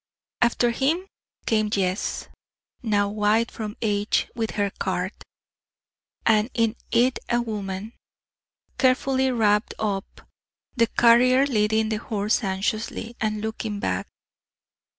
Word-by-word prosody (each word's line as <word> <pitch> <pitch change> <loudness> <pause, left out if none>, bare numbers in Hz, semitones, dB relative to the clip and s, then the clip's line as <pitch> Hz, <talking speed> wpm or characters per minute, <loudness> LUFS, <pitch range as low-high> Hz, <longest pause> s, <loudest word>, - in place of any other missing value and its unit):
After 240 0 +3
him 300 +10 0 0.4
came 215 -2 +1
Jess, 190 -2 -1 0.5
now 205 -3 +1
white 215 +2 +1
from 215 -1 -6
age, 205 -1 0
with 225 -2 -3
her 200 -1 +1
cart; 185 +2 -1 1.1
and 220 +1 +3
in 230 -1 +2
it 245 +2 +2
a 240 - +2
woman, 210 -2 -4 0.9
carefully 265 0 +2
wrapped 210 -3 +2
up 200 -3 -3 0.5
the 230 -2 +3
carrier 250 +4 +5
leading 220 -3 +1
the 220 - 0
horse 210 0 -1
anxiously, 215 +4 -2
and 215 -1 -1
looking 220 -1 -4
back. 90 - -2
220 Hz, 110 wpm, -24 LUFS, 205-235 Hz, 1.1 s, carrier